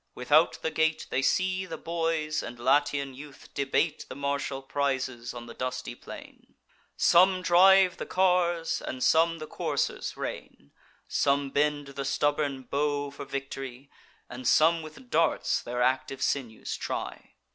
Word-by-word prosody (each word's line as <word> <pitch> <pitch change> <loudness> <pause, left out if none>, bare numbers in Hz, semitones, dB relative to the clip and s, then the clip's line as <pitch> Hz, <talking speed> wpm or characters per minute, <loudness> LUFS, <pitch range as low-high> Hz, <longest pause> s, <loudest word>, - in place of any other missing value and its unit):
Without 150 +6 +4
the 160 - 0
gate, 160 0 +1
They 130 - +1
see 185 +6 +1
the - - -6
boys 165 -2 -1
and 120 0 -7
Latian 140 +2 +1
youth 140 +1 -13
debate 140 +3 0
The - - -7
martial 140 -1 -2
prizes 130 -3 -2
on 120 -1 -8
the 115 - -10
dusty 125 0 -4
plain: - - -12 0.4
Some 185 +1 +5
drive 185 +1 +6
the - - -6
cars, 175 -3 +1
and 130 0 -4
some 165 +1 +4
the 155 - -7
coursers - - -2
rein; 70 - -7 0.4
Some 140 -1 +1
bend 145 0 0
the 140 0 -5
stubborn 145 -1 0
bow 145 +2 -1
for 140 - -8
victory, 135 -1 -6 0.4
And 125 0 -6
some 165 +2 +4
with 160 +11 -12
darts 165 - +2
their 125 +1 -2
active 130 +1 0
sinews 120 -6 -2
try. - - -5
145 Hz, 145 wpm, -28 LUFS, 135-165 Hz, 0.4 s, drive